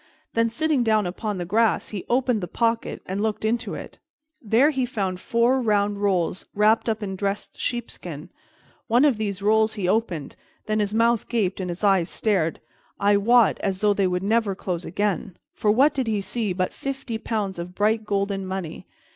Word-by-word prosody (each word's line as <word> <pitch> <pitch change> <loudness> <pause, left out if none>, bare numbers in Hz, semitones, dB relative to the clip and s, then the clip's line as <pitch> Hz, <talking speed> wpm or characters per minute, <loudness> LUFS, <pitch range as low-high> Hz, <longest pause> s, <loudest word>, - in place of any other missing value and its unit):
Then, 230 0 +2
sitting 295 +3 +1
down 215 -3 +2
upon 200 +3 -3
the 175 - -3
grass, 220 +4 +1
he 200 -4 -6
opened 245 -3 +2
the 180 - -3
pocket 230 +2 -1
and 190 +2 -3
looked 215 0 -1
into 225 -1 -1
it. - - -9 0.4
There 240 +7 +4
he 265 -3 -1
found 195 -7 -2
four 235 +5 +2
round 205 -2 +1
rolls 190 -2 0
wrapped 215 +3 +3
up 220 -1 -2
in 190 -1 -3
dressed 200 +1 -3
sheepskin; 240 -1 -4 0.6
one 245 +5 +4
of 275 -7 +3
these 200 -2 -3
rolls 220 +1 +3
he 195 -4 -2
opened; 185 -7 -1 0.3
then 215 0 0
his 210 0 -1
mouth 230 0 +2
gaped 205 -6 0
and 185 -1 -3
his 175 +4 -5
eyes 195 -4 +3
stared, 185 -7 0 0.4
I 205 +1 +4
wot, 230 +2 +4
as 195 -2 -2
though 210 -1 +4
they 195 -1 +1
would 180 0 -1
never 215 -1 +1
close 180 -2 -4
again, 200 0 -2 0.2
for 210 - 0
what 265 +8 +5
did 260 -3 -1
he 215 -2 0
see 210 +1 -2
but 185 0 -1
fifty 270 -5 -4
pounds 205 -5 -3
of 180 +1 -7
bright 215 +2 +1
golden 200 -1 -1
money? 185 -4 -5
210 Hz, 190 wpm, -24 LUFS, 195-230 Hz, 0.6 s, what